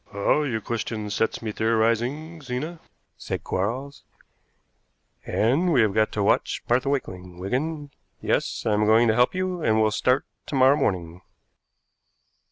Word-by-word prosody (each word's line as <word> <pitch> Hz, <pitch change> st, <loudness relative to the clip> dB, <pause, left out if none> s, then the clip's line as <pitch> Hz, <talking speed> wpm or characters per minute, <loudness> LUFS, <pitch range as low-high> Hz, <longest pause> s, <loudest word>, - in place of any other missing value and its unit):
"Ah, 100 Hz, +9 st, +2 dB
your 120 Hz, -7 st, -2 dB
question 110 Hz, -2 st, -4 dB
sets 110 Hz, +3 st, -1 dB
me 110 Hz, -, -2 dB
theorizing, 115 Hz, +9 st, 0 dB
Zena," 145 Hz, +6 st, -5 dB, 0.4 s
said -, -, -5 dB
Quarles, 125 Hz, +9 st, -3 dB, 1.2 s
"and 140 Hz, +11 st, +2 dB
we 130 Hz, -6 st, +4 dB
have 105 Hz, -3 st, +2 dB
got 110 Hz, +1 st, +2 dB
to 105 Hz, -, 0 dB
watch -, -, +1 dB
Martha 125 Hz, +3 st, +2 dB
Wakeling, 90 Hz, -10 st, -4 dB
Wigan. 145 Hz, -, -3 dB, 0.3 s
Yes, -, -, -1 dB
I 110 Hz, -, +2 dB
am 105 Hz, 0 st, +2 dB
going 115 Hz, +2 st, +5 dB
to -, -, +4 dB
help 125 Hz, +8 st, +2 dB
you, 185 Hz, -1 st, -2 dB
and 110 Hz, -5 st, +2 dB
we'll 110 Hz, -1 st, +3 dB
start 125 Hz, +6 st, +1 dB, 0.2 s
to -, -, -4 dB
morrow 130 Hz, +1 st, +5 dB
morning." 90 Hz, -, -2 dB
115 Hz, 150 wpm, -24 LUFS, 105-140 Hz, 1.2 s, going